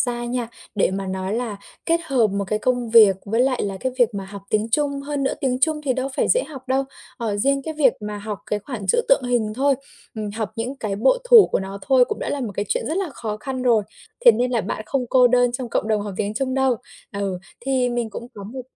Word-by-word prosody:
ra 240 -1 -1
nha, 240 -1 -2 0.3
để 195 - +2
mà 195 +1 -3
nói 190 +1 -3
là 230 -3 -3 0.3
kết 335 0 +2
hợp 260 -7 +3
một 200 -1 -2
cái 215 - 0
công 245 0 0
việc 215 -4 +7
với 225 +3 0
lại 255 0 +2
là 195 -1 -3
cái 260 -1 -1
việc 240 -3 +3
mà 195 -1 -4
học 200 0 -9
tiếng 215 +1 +1
Trung, 280 +2 +1
hơn 285 0 -3
nữa 270 - 0
tiếng 255 -2 0
Trung 310 +1 +2
thì 265 - +2
đâu 260 +1 -2
phải - - +1
dễ - - +4
học 270 -4 -11
đâu, 265 +1 +2 0.3
ờ, 220 -4 -2
riêng 275 +6 +1
cái 315 +2 -5
việc 275 -5 +4
mà 210 0 -5
học 205 -1 -5
cái 210 - -1
khoản 210 -2 -7
chữ - - +4
tượng 275 - +5
hình 235 -4 0
thôi, 275 +3 +3 0.4
ừm, 215 -2 -4
học 220 0 -4
những 245 +4 -3
cái 215 -6 -3
bộ - - +3
thủ 475 -4 +8
của - - -1
nó 195 +1 -6
thôi 260 -2 +5
cũng - - -4
đã - - -3
là 285 - -2
một 225 -6 -3
cái 205 - -1
chuyện - - -1
rất 320 - -1
là 390 -3 -1
khó 220 -4 -5
khăn 260 +4 -5
rồi. 235 -4 +4 0.4
Thế 475 - +10
nên 250 - 0
là 235 -3 +1
bạn 215 - -4
không 260 0 -1
cô 255 -1 +6
đơn 245 0 +3
trong 245 -1 -4
cộng 220 - -1
đồng 215 -1 +2
học 205 -2 -6
tiếng 205 +1 -2
Trung 260 +2 -1
đâu. 265 -2 +2 0.4
Ừ, 200 -3 -2 0.2
thì 255 0 +1
mình 240 -2 -2
cũng 235 - -7
có 200 -1 -8
một 255 +5 -7
240 Hz, 265 wpm, -22 LUFS, 210-265 Hz, 0.4 s, Thế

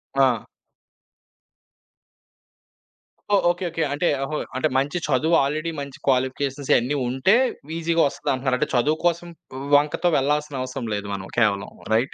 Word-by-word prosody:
ఆ! 130 -5 +3 2.9
ఓహ్! 200 - +4
Okay. 175 +1 -6
Okay. 165 -1 -2
అంటే 165 +4 0 0.2
ఓహో! 150 +2 -3 0.2
అంటే 130 +4 +1
మంచి 140 +5 0
చదువు 150 +4 +2
ఆల్రెడీ 155 +4 -2
మంచి 140 -1 -7
క్వాలిఫికేషన్స్ 135 +1 0
అయ్యని 125 +5 +2
ఉంటే, 130 - +3 0.4
వీజీగా 165 0 +1
వస్తదంటున్నారు. 130 -2 -1
అంటే 150 +3 0
చదువు 150 +6 +2
కోసం 175 0 +1 0.5
వంకతో 150 +4 +2
వెళ్లాల్సిన 145 -1 0
అవసరం 130 -2 -4
లేదు 100 0 -3
మనం 95 -1 -5
కేవలం 100 -3 +1 0.2
రైట్? 120 +5 +1
140 Hz, 130 wpm, -23 LUFS, 130-155 Hz, 2.9 s, ఓహ్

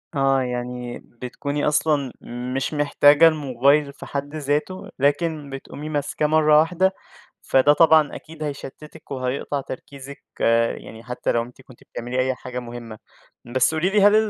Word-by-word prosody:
آه، 135 -1 +3
يعني 125 -1 -4
بتكوني 140 +5 -4
أصلًا 150 -3 +1 0.4
مش 135 +3 -2
محتاجة 145 +2 +5
الموبايل 140 -1 +2
في - - -11
حد 145 +2 -5
ذاته، 150 +5 -2
لكن 145 +1 0
بتقومي 140 +3 -8
ماسكاه 145 0 -1
مرّة 155 -1 +5
واحدة، 180 +4 +2 0.5
فده 135 +2 +4
طبعًا 160 -2 +5
أكيد 155 -1 -9
هيشتتِك 145 0 -8
وهيقطع 135 +2 -2
تركيزِك 140 +2 -10 0.5
يعني 110 +1 -11
حتى 125 +1 -2
لو 115 0 +1
أنتِ 125 +2 -14
كنتِ 130 -2 -18
بتعملي 125 +2 -5
أي 130 0 +1
حاجة 125 0 -6
مهمة. 120 -2 -9 0.6
بس 130 +5 +3
قولي 175 +4 +1
لي 205 0 +3
هل 205 +1 +6
140 Hz, 145 wpm, -22 LUFS, 130-150 Hz, 0.6 s, هل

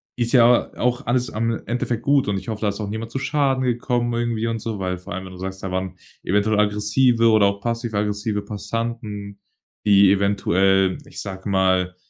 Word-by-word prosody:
ist 120 -1 -1
ja 120 -1 +5
auch 125 0 0
alles 125 +1 0
am 115 +1 -2
Endeffekt 120 -1 -2
gut 140 -3 +3
und 100 -1 0
ich 95 - -15
hoffe, 110 -2 -4
da 105 - +1
ist 100 - -5
auch 105 -2 -4
niemand 110 +2 -5
zu 135 - -3
Schaden 135 -2 +1
gekommen 120 -1 0
irgendwie 115 -1 -1
und 115 -1 -2
so, 110 -1 -5
weil, 90 -1 -2
vor 90 - -9
allem, 95 +1 -5
wenn 95 - -10
du - - -11
sagst, 95 +1 -6
da 95 - -3
waren 95 0 -3 0.3
eventuell 105 +2 +1
aggressive 105 +3 +3
oder 110 -2 +5
auch 100 0 -2
passiv-aggressive 105 -2 -2
Passanten, 105 -1 -5 0.5
die 100 -2 +6
eventuell, 95 -1 +2
ich 140 - -8
sage 95 0 -7
mal, 95 -1 +1
105 Hz, 195 wpm, -22 LUFS, 100-120 Hz, 0.5 s, die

